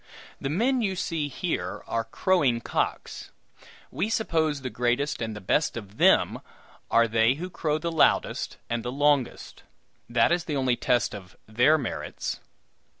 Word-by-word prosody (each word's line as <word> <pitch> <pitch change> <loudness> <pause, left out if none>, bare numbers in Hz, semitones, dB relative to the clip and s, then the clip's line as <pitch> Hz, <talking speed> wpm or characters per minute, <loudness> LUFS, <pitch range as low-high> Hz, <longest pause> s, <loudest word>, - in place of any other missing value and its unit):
The 135 - -3
men 240 - +1
you 195 -4 0
see 165 -4 -2
here 165 +5 -3
are 115 -1 -2
crowing 135 -2 +1
cocks. - - -3 0.6
We 210 - -1
suppose 160 -10 0
the 130 -1 -5
greatest 125 +4 0
and 110 -1 -3
the 105 - -8
best 120 +8 +1
of 105 -2 -9
them - - +4 0.5
are 115 0 +4
they 115 +3 +3
who 180 +5 -6
crow 155 -3 -1
the 170 +2 -3
loudest 165 - +1
and 120 0 -2
the 120 - -4
longest; 145 -1 0 0.5
that 120 +4 +3
is 175 0 +1
the 155 -5 -3
only 130 -2 +2
test 120 -1 +1
of 95 -3 -10
their 125 +8 +4
merits." 135 -6 -4
140 Hz, 155 wpm, -26 LUFS, 115-165 Hz, 0.6 s, them